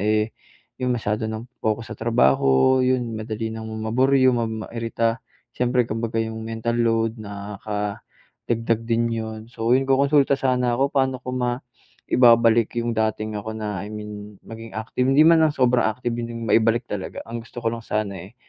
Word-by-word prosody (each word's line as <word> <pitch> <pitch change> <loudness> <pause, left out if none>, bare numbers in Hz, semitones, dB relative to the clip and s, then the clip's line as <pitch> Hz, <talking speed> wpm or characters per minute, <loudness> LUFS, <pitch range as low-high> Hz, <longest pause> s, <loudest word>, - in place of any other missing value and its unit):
eh, 105 +2 +1 0.5
yung 125 0 0
masyado 110 -1 -2
ng 110 +2 -5 0.2
focus 110 +1 -1
sa - - -17
trabaho, 110 - +3
'yon 125 -3 0
madali 110 +1 -4
ng 110 0 -6 0.2
maburyong, 130 +1 +4
ma 115 -1 0 0.2
mairita, 115 0 -1 0.4
siyempre 125 -1 +2
kambaga 115 +1 -2
yung 110 0 -5
mental 115 +1 -2
load 115 -1 +1
nakadagdag 105 +2 -4
din 115 0 +1
'yon. 110 -1 -4
So 115 0 0
'yon, 135 +1 +2
kokonsulta 140 +1 +4
sana 125 -2 +1
ako. 135 +1 +2
Pa'no 130 -2 +1
ko 130 - -5
maibabalik 120 -2 +2
yung 120 - -1
dating 110 -1 -1
ako 110 +2 -5
na 105 -4 -4
I 105 - -8
mean 105 0 -8
maging 115 0 -10
active, 115 +3 -1
hindi 135 +3 +6
man 165 -1 +6
lang 155 - 0
sobrang 125 -2 +3
active 120 +3 -2
'yon 120 0 -4
'yong 115 - -6
maibalik 115 +3 +3
talaga, 100 -2 -5
ang 115 +1 -5
gusto 120 +1 -9
ko 115 - +1
lang 115 -1 -6
sana, 105 -2 -1
eh, 95 +6 -11
115 Hz, 170 wpm, -23 LUFS, 110-125 Hz, 0.5 s, hindi